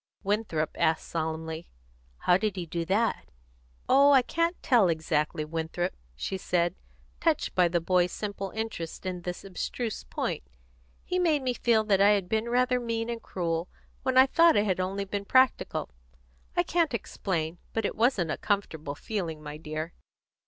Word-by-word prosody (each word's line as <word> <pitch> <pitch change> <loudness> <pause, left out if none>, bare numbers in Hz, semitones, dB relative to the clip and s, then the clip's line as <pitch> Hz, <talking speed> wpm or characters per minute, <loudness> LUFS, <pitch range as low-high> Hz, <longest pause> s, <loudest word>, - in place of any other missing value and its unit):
Winthrop 195 -7 0
asked 160 - +2
solemnly, 160 0 -3 0.5
"How 180 - +4
did 200 +1 0
he 180 -2 -3
do 165 +1 -3
that?" 215 +6 0 0.6
"Oh, 280 +2 +6
I 265 -2 +6
can't 335 +6 0
tell 230 -8 +5
exactly, 155 -1 0
Winthrop," 165 +3 -2 0.2
she 190 - -3
said, 175 -1 +1 0.5
touched 325 -2 +1
by 180 -1 +4
the 170 0 +1
boy's 180 +1 +2
simple 200 -2 -4
interest 220 -7 -4
in 180 -1 -3
this 180 0 -5
abstruse 215 +4 -4
point. - - -3 0.6
"He 365 - 0
made 315 -6 +2
me 255 -1 +1
feel 230 -2 +2
that 200 -2 +3
I 200 - +7
had 195 -3 0
been 220 +1 0
rather 250 +1 +2
mean 230 -1 -2
and 230 -1 -5
cruel 170 -3 -2 0.3
when 260 -1 0
I 260 - +9
thought 330 +4 +5
I 205 - +4
had 190 -3 0
only 195 +2 -1
been 200 +1 -3
practical. 255 - +2 0.7
I - - +5
can't 325 - +1
explain; 175 -6 -3
but 225 -2 -1
it - - -1
wasn't 215 - +2
a - - -2
comfortable 160 -8 -2
feeling, 165 -6 -4
my 150 0 -6
dear." 155 +1 -5
195 Hz, 165 wpm, -28 LUFS, 165-230 Hz, 0.7 s, I